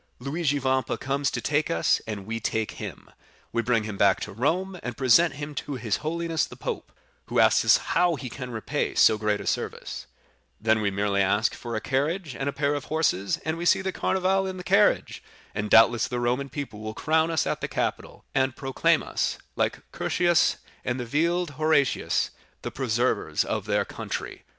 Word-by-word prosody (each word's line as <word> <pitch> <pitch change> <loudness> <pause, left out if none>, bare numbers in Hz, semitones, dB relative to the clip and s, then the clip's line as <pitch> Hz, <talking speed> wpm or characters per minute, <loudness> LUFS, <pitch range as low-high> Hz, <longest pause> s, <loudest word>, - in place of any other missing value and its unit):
Luigi 145 +2 -1
Vampa 130 -1 0
comes 140 0 -1
to - - -3
take 150 +1 0
us, 85 - +2
and 105 -3 -5
we 115 +2 -3
take 110 0 -1
him—we 115 - -7
bring 115 -1 +1
him 105 -2 -5
back 100 -1 +4
to 105 - -5
Rome, 165 - 0
and 125 - -5
present 140 +5 +4
him 145 +1 -6
to 145 0 -4
his 115 -5 -1
holiness 165 +1 -1
the - - -11
Pope, - - -5 0.4
who - - -3
asks - - +5
how 175 -2 +1
he 130 -2 -6
can 125 +1 -7
repay 115 -2 -2
so 110 - +5
great 105 -1 0
a - - -7
service; - - -3 0.5
then 110 0 +2
we 105 - +1
merely 100 0 0
ask 105 +3 +2
for 120 -1 -6
a - - 0
carriage 145 - -1
and 135 +1 -2
a - - -1
pair 140 +1 0
of 145 -2 -3
horses, 150 - 0
and 160 +1 -1
we 175 - -3
see 190 - +4
the 190 - -1
Carnival 190 +1 +1
in 190 0 -5
the 180 - -7
carriage, 200 +3 +2 0.3
and 105 0 -3
doubtless 115 +1 +6
the 125 - -3
Roman 125 +3 0
people 140 -8 -6
will 110 0 -6
crown 160 +1 +2
us 160 -3 +1
at - - -2
the - - -1
Capitol, - - -3
and 130 -1 +1
proclaim 135 -1 +1
us, - - -1 0.2
like - - -1
Curtius 175 -1 +2 0.3
and 125 0 -2
Horatius 165 +6 0 0.8
Cocles, - - -28 0.2
the - - -4
preservers 125 -1 0
of - - -2
their - - +1
country." - - -6
135 Hz, 190 wpm, -26 LUFS, 110-160 Hz, 0.8 s, doubtless